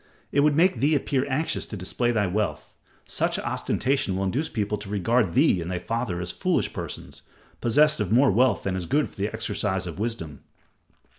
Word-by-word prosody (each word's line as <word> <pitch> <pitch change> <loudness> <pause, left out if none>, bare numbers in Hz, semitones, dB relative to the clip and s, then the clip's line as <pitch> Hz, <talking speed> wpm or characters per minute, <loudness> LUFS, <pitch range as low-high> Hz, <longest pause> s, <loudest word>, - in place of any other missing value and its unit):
"It 145 - +2
would 145 0 +4
make 170 -2 +3
thee 145 +5 +3
appear 140 -1 0
anxious 150 +4 -1
to 105 - -6
display 120 +6 -1
thy 110 -3 +1
wealth. 105 +3 -2 0.3
Such - - -1
ostentation 135 -7 -1
will 95 - -1
induce 130 - -1
people 105 -2 -2
to 105 -1 -9
regard 105 0 +1
thee 130 - +3
and 85 - -5
thy 90 - -2
father 115 -2 -3
as 90 0 -3
foolish - - 0
persons, - - -7 0.4
possessed 150 +5 +4
of 105 -3 -1
more 130 +2 +5
wealth 120 0 +2
than 95 -1 -1
is 90 -3 -4
good 145 +3 +2
for - - -17
the 100 +1 -1
exercise 100 -2 -2
of 85 -1 -7
wisdom. 105 -11 -4
110 Hz, 195 wpm, -25 LUFS, 95-135 Hz, 0.4 s, more